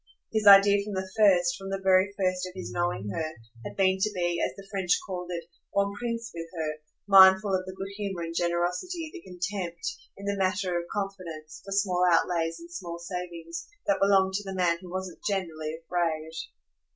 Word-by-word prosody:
His 215 -1 +1
idea 200 0 +8
from 210 0 -6
the 190 0 -2
first, 180 -5 +4
from 195 0 -7
the 195 - -1
very 190 0 +4
first 185 -1 0
of 180 - -10
his 185 - -6
knowing 175 - -1
her, 160 -1 -3 0.3
had - - -8
been 190 -1 +3
to 205 - +2
be, 175 -1 0
as - - 0
the 195 - -11
French 190 -3 +2
called 180 -2 -5
it, 170 -1 -4 0.3
bon 200 0 +2
prince 230 +1 -4
with 165 0 -6
her, 155 -1 -2 0.3
mindful 195 +1 +8
of 185 0 0
the 185 - -7
good 195 - -5
humour 195 -4 -3
and 165 0 -5
generosity, 180 - -1
the 360 - -8
contempt, 180 - -4 0.2
in 200 - -9
the 200 0 -1
matter 190 -1 0
of 170 0 -2
confidence, 180 -6 -5
for 195 - -9
small 190 -3 +2
outlays 165 -1 +1
and 340 0 -12
small 170 - -6
savings, 170 -1 -6 0.2
that 195 -1 +2
belonged 195 -1 +4
to 205 +2 -1
the 195 -1 -6
man 170 -2 +2
who 180 - -10
wasn't 185 -1 -5
generally 160 -6 -2
afraid. 165 -3 -1
185 Hz, 195 wpm, -28 LUFS, 175-200 Hz, 0.3 s, idea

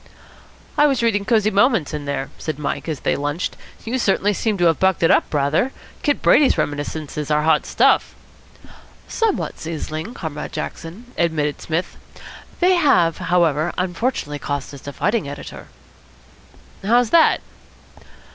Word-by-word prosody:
"I 295 - +6
was 265 -4 0
reading 205 -3 +1
Cosy 215 -2 +2
Moments 205 - +2
in 150 -1 -4
there," 140 -1 -3
said 155 -3 -4
Mike, 150 +2 -3
as 150 -4 -4
they - - +1
lunched. 145 +4 -3 0.3
"You 250 +3 -1
certainly 205 -1 +2
seem 215 +1 -1
to 175 - +2
have 165 -2 +3
bucked 190 -2 +2
it 165 - +5
up - - +2
rather. 150 - +1 0.3
Kid 290 -2 0
Brady's 285 -2 +5
reminiscences 145 0 -3
are 150 0 +2
hot 155 -1 +2
stuff." - - +3 0.9
"Somewhat 450 -4 -1
sizzling, 160 +5 -5
Comrade 150 -3 -6
Jackson," 220 +10 -7
admitted 155 -4 0
Psmith. 165 +3 -3 0.6
"They 365 +1 +5
have, 175 - +3
however, 175 -3 +1
unfortunately 180 - -2
cost 145 -1 -4
us 140 0 -11
a - - -3
fighting 210 -5 -1
editor." 145 - -9 1.2
"How's 235 +3 +3
that?" 335 -1 +5
170 Hz, 145 wpm, -21 LUFS, 150-225 Hz, 1.2 s, I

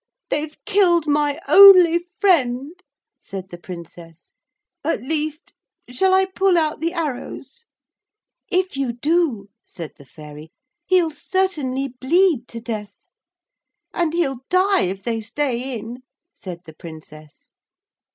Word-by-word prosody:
'They've 300 +1 -2
killed 370 -6 +3
my 295 0 +1
only 370 -4 +8 0.2
friend,' 300 - +1 0.4
said 190 -1 -8
the 175 - -8
Princess, 170 -2 -12 0.5
'at 330 - 0
least.... 310 +2 -3 0.4
Shall 375 +9 +2
I 380 0 +4
pull 380 -1 +1
out 310 -2 0
the 330 +2 -1
arrows?' 335 - -6 0.8
'If 370 -3 0
you 270 -3 -2
do,' 275 - 0
said 170 -5 -9
the 140 - -16
Fairy, 150 +2 -12 0.4
'he'll 355 -3 +3
certainly 295 -6 -2
bleed 265 +1 +1
to 230 - -8
death.' 215 -3 -6 1.0
'And 335 -2 0
he'll 280 -7 -1
die 380 - +3
if 190 +2 -4
they 225 0 -2
stay 255 +1 -2
in,' 235 +3 -9 0.3
said 175 -3 -9
the 160 - -12
Princess. 155 -2 -13
285 Hz, 120 wpm, -21 LUFS, 215-345 Hz, 1.0 s, only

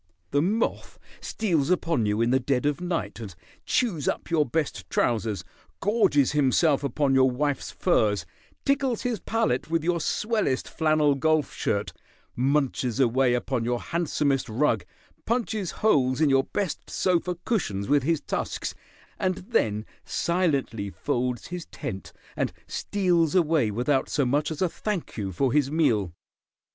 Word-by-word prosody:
The 145 - +3
moth 210 +8 -1 0.2
steals 170 -10 0
upon 165 -10 +1
you 105 +2 +1
in 115 +1 +2
the 130 - +4
dead 130 0 0
of 145 +3 0
night, 175 -7 -3
and 100 -6 -8 0.3
chews 190 - 0
up - - -2
your 155 -4 +3
best 150 +3 -2
trousers, 110 -3 0 0.4
gorges 195 - +3
himself 145 +1 +3
upon 140 +1 +1
your 130 0 +5
wife's 140 +2 -1
furs, 105 -5 +1 0.4
tickles 270 -4 +1
his 240 -4 -1
palate 220 - 0
with 165 -1 0
your 170 0 +1
swellest 210 - 0
flannel 155 -2 +2
golf 155 +1 +1
shirt, 100 0 -1 0.4
munches 135 -2 0
away 125 0 +3
upon 125 0 -1
your 120 +1 0
handsomest 145 -6 0
rug, 115 -5 +1 0.4
punches 220 -5 -1
holes 130 -12 +2
in 155 -3 +4
your 135 0 +3
best 200 -6 -3
sofa 180 -1 0
cushions 105 - -1
with 145 0 +4
his 160 +3 0
tusks, - - -3 0.5
and 185 -1 +1 0.2
then 110 - +1 0.2
silently 140 - 0
folds 125 +1 -2
his 175 -1 -5
tent 95 -4 -6 0.2
and - - -1
steals 180 -5 +1
away 160 -9 +3
without 125 +6 0
so 140 - +1
much 145 +4 +1
as 160 +2 -2
a - - +3
thank 195 +1 -4
you 100 -4 -3
for 130 +7 0
his 145 -2 +3
meal. 125 - +1
145 Hz, 150 wpm, -26 LUFS, 125-170 Hz, 0.5 s, your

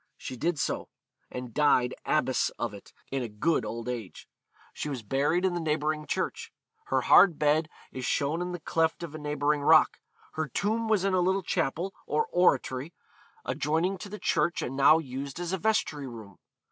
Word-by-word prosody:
She 130 - -7
did 165 +6 -1
so, - - -2 0.4
and 125 -2 -7
died 130 -4 +3
abbess 130 -4 +2
of 120 -3 -3
it, 100 - -12 0.2
in 135 -1 -1
a 120 - -4
good 125 +7 0
old 115 +2 -5
age. 115 -6 -6 0.5
She 150 - -4
was 130 -5 -5
buried 145 - +1
in 185 - +1
the 175 - -1
neighbouring 155 -1 -1
church.... - - -3 0.3
Her - - +1
hard 175 -6 +6
bed 155 +1 +2 0.2
is 130 - -6
shown 150 +6 0
in 180 0 -3
the 175 - -5
cleft 160 +2 0
of 165 -3 -6
a 155 - -6
neighbouring 150 0 0
rock. 140 - +5 0.3
Her 155 -1 -2
tomb 220 - -1
was 215 -4 +2
in 195 - +1
a 185 - +3
little 190 +2 +1
chapel, 170 +4 -1
or 455 - +1
oratory, 145 -3 +1 0.5
adjoining 165 +6 0
to 200 - -8
the 210 - -6
church 175 - 0
and 130 - -4
now 140 +3 +6
used 140 0 -5
as 175 +1 -3
a 190 - -1
vestry 160 -8 0
room. 110 -6 -11
150 Hz, 185 wpm, -28 LUFS, 130-175 Hz, 0.5 s, hard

